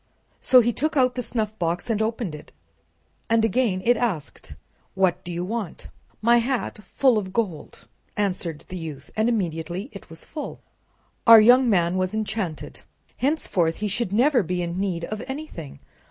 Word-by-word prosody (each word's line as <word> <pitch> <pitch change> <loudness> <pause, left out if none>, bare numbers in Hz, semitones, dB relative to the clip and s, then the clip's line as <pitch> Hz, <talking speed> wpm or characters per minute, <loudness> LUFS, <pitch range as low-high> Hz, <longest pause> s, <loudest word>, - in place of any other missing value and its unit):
So 255 -1 +6
he 240 +1 +1
took 310 +5 -1
out 255 -1 +4
the 250 - -3
snuffbox 215 -7 -2
and 220 -2 0
opened 220 -5 -2
it, 150 - -11 0.8
and 225 0 +3
again 220 -4 0
it 245 +1 +5
asked: 195 - -3 0.4
"What 190 -2 +1
do 175 - -6
you 175 +1 -3
want?" 210 -4 -5 0.3
"My 235 +1 +5
hat 245 -2 -2
full 250 +2 +2
of 190 -2 -6
gold," 185 -8 -4 0.3
answered 180 -6 -2
the 185 - -5
youth, 150 -5 -8
and 220 +2 +2
immediately 180 - -2
it 200 - -11
was 165 - -11
full. 300 -2 -7 0.7
Our 230 -1 +11
young 245 +3 +6
man 175 -3 +2
was 185 +2 -1
enchanted. 210 -6 -4 0.4
Henceforth 195 - 0
he 210 - -3
should 200 0 -1
never 250 +4 +4
be 180 0 -2
in 170 +1 -3
need 180 -4 -2
of 215 +4 -5
anything. 265 - -7
210 Hz, 165 wpm, -24 LUFS, 175-235 Hz, 0.8 s, Our